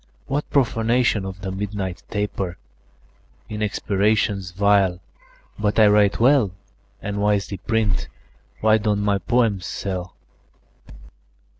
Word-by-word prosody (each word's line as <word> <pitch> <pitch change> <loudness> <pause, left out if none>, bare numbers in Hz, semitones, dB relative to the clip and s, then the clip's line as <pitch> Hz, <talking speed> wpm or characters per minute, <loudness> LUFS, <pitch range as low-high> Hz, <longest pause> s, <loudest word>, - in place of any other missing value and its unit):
"What 145 +2 -2
profanation 115 -4 +2
of 95 0 -7
the 95 -1 -4
midnight 95 -1 -4
taper 100 -4 -3 0.9
In 110 0 -5
expirations 105 -1 0
vile! 95 -1 +2 0.6
But 105 -1 0
I 110 - +7
write 105 -1 +3
well, 125 -3 +4 0.5
And 100 0 -3
wisely 100 -1 0
print. 110 -1 0 0.5
Why 110 0 +4
don't 105 -1 0
my 100 -1 +1
poems 100 -3 +1
sell?" 90 -2 -4
105 Hz, 110 wpm, -22 LUFS, 95-110 Hz, 0.9 s, I